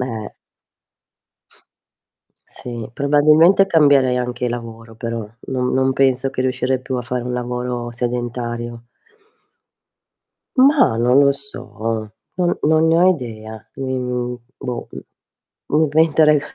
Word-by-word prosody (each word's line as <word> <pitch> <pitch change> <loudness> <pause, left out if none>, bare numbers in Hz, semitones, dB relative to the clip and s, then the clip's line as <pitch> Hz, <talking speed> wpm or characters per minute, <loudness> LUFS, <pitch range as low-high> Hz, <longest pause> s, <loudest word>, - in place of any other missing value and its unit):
Eh. 115 -4 -5 2.1
Sì, 120 -3 -6
probabilmente 150 +8 +4
cambierei 145 -7 +4
anche 125 0 -2
lavoro, 115 -1 -7
però, 115 -1 -5 0.2
non 125 -1 -1
non 130 0 +2
penso 135 0 +1
che 130 - -4
riuscirei 130 0 -1
più 130 0 -5
a 125 - -3
fare 125 0 -3
un 125 - -3
lavoro 125 0 -3
sedentario. 120 -1 -3 1.7
Ma, 270 - +5
non 125 +3 +3
lo 140 0 +5
so, 115 -6 -5 0.2
non 180 -1 0
non 160 +1 +3
ne 165 - +4
ho 180 +2 +5
idea. 110 - -6
Mi 130 -1 -3
mhmm, 125 -1 -3 0.2
boh, 125 -2 -5 0.8
mhmm, 155 +1 +2
mi 160 +1 +5
inventerei 150 -1 +4
125 Hz, 120 wpm, -19 LUFS, 120-145 Hz, 2.1 s, Ma